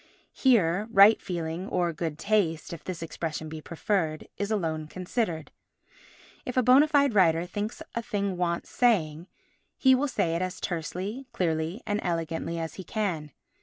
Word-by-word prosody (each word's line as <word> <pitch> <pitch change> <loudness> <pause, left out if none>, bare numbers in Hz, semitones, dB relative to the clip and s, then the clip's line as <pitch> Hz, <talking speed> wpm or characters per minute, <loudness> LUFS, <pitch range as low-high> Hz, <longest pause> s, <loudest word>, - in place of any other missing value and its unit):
Here, 210 -6 +3
right 205 0 +7
feeling—or 175 0 -2
good 155 -1 -3
taste, 175 -5 0
if 170 - -9
this 175 -3 -5
expression 160 -1 -4
be 155 0 -7
preferred—is 170 +3 -2
alone 160 -7 -1
considered. 180 -1 -3 0.9
If 250 - -5
a 255 - +4
bona 260 +5 +6
fide 285 -4 +3
writer 170 -4 +4
thinks 205 +5 -4
a 235 - -2
thing 200 -5 -2
wants 170 -1 -2
saying, 175 -9 +1 0.5
he 265 -1 +5
will 270 +3 +2
say 165 -10 0
it 170 - -1
as 185 0 -3
tersely, 185 - -4
clearly 165 +4 -1
and 205 -1 0
elegantly 165 -1 -2
as 165 -1 -4
he - - -10
can. 175 -9 -2
180 Hz, 150 wpm, -27 LUFS, 165-215 Hz, 0.9 s, right